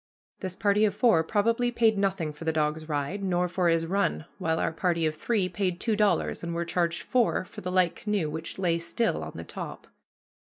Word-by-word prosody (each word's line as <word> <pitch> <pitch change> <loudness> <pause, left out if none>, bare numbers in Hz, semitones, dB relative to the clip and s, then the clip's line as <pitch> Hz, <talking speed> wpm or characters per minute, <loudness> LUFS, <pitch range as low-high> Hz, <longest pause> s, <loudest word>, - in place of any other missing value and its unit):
This 185 -1 -4
party 205 +1 +2
of 200 -2 0
four 220 -10 +4
probably 230 +6 +1
paid 230 -2 +3
nothing 190 -6 0
for 150 - -10
the 160 - +1
dog's 155 0 -1
ride, 150 +7 -2
nor 180 -1 +1
for 175 0 +1
his 165 0 +2
run, 190 -3 0
while 160 -3 0
our - - 0
party 170 0 0
of 155 - +1
three 200 +4 0
paid 185 -2 -2
two 225 0 +1
dollars 210 -4 +1
and 170 0 -3
were 170 0 -1
charged 170 0 0
four 240 -6 +1
for - - -10
the 180 - -4
light 185 -2 +3
canoe 210 -6 -1
which 160 +2 -5
lay 170 -3 +1
still 170 +7 -1
on - - -7
the - - -6
top. - - -7
180 Hz, 215 wpm, -27 LUFS, 165-205 Hz, -, four